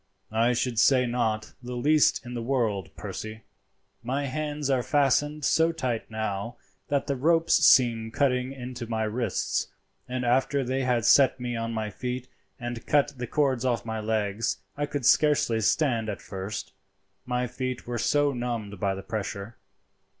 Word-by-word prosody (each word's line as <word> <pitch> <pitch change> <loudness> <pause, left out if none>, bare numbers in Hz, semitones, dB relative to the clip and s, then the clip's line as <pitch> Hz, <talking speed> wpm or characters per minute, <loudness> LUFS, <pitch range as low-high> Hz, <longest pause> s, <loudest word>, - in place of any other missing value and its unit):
"I 115 +3 +3
should 120 -1 0
say 130 +1 +5
not 115 -3 -1
the 125 0 -6
least 150 +3 +3
in 120 - -7
the 120 - -3
world, 115 -7 0
Percy. 110 0 -7 0.6
My 135 +5 -2
hands 150 +1 -3
are 135 -2 +2
fastened 145 +2 +1
so 165 +1 +3
tight 130 -8 -3
now 110 +1 -3 0.3
that 140 -1 0
the 140 -1 -1
ropes 165 +5 +3
seem 115 -3 +5
cutting 125 +1 +1
into 125 -2 -7
my 110 -1 0
wrists, 110 -2 -1 0.4
and 125 0 -2
after 135 +3 +2
they 130 +2 -1
had 120 -3 +1
set 135 -2 +5
me 120 -1 -3
on 115 0 -2
my 110 -2 -3
feet 125 +3 -4 0.3
and 120 -1 -5
cut 145 0 +3
the 125 - -3
cords 135 -4 +1
off 120 -5 0
my 110 -1 -3
legs 110 0 -1 0.2
I 145 0 -2
could 145 -4 -3
scarcely 140 -7 +4
stand 115 -2 +1
at 100 - -4
first, 95 +2 -6 0.5
my 125 0 0
feet 125 0 -4
were 120 -1 -3
so 145 +5 +2
numbed 115 -5 -4
by 100 0 0
the 95 - -7
pressure. 105 +1 -5
125 Hz, 165 wpm, -27 LUFS, 110-135 Hz, 0.6 s, say